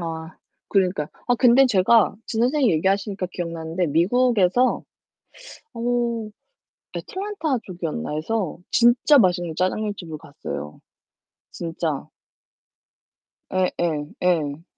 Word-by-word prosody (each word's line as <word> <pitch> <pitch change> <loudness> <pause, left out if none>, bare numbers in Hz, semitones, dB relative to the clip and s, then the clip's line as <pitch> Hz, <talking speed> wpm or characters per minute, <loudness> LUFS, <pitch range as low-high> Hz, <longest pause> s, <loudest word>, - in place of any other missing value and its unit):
아. 160 0 -6 0.3
그러니까요. 185 -6 +1 0.2
아 245 - +5
근데 255 +2 +6
제가 220 -1 +4
지금 230 0 0
선생님이 260 - +2
얘기하시니까 195 +3 0
기억나는데 170 0 -3
미국에서 210 - +2 0.9
어 235 - -8 1.2
애틀랜타 375 - -3
쪽이었나에서 175 +1 -3
진짜 240 +5 +5
맛있는 175 -6 +2
짜장면 205 +4 0
집을 160 -4 -7
갔어요, 75 - -8 0.7
진짜. 165 -3 -3 1.4
예 185 -1 +2
예. 155 -3 -2
예. 160 -4 0
185 Hz, 250 characters per minute, -23 LUFS, 165-235 Hz, 1.4 s, 근데